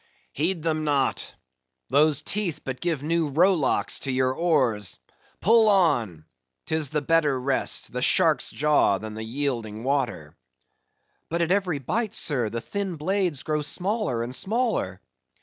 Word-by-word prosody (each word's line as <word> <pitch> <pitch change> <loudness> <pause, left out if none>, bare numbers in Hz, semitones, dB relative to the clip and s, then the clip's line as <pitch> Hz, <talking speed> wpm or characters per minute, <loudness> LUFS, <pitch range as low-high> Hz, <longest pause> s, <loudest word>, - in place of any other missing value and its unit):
"Heed 165 +2 0
them 155 -1 -1
not! 145 -3 -1 0.6
those 150 +2 +3
teeth 200 -6 -2
but 130 -1 -6
give 165 -5 -1
new 165 0 0
rowlocks 165 0 +2
to 135 - -3
your 130 0 +1
oars. 130 - +1 0.4
Pull 220 +2 +5
on! 120 - +2 0.4
'tis 160 -3 0
the 150 0 -2
better 150 -4 +2
rest, 135 +1 -1
the - - -2
shark's - - +3
jaw 150 -9 +2
than 110 +2 -7
the 110 +1 -6
yielding 115 -3 -3
water." 125 - -2 0.9
"But 170 +1 0
at 170 - -1
every 185 -5 +1
bite, 215 - -2
sir, 125 -7 +1
the 115 +1 -4
thin 195 - -4
blades 175 -2 -1
grow 155 -1 -1
smaller 175 - -1
and 120 +2 -5
smaller!" 210 - -1
150 Hz, 145 wpm, -25 LUFS, 130-175 Hz, 0.9 s, Pull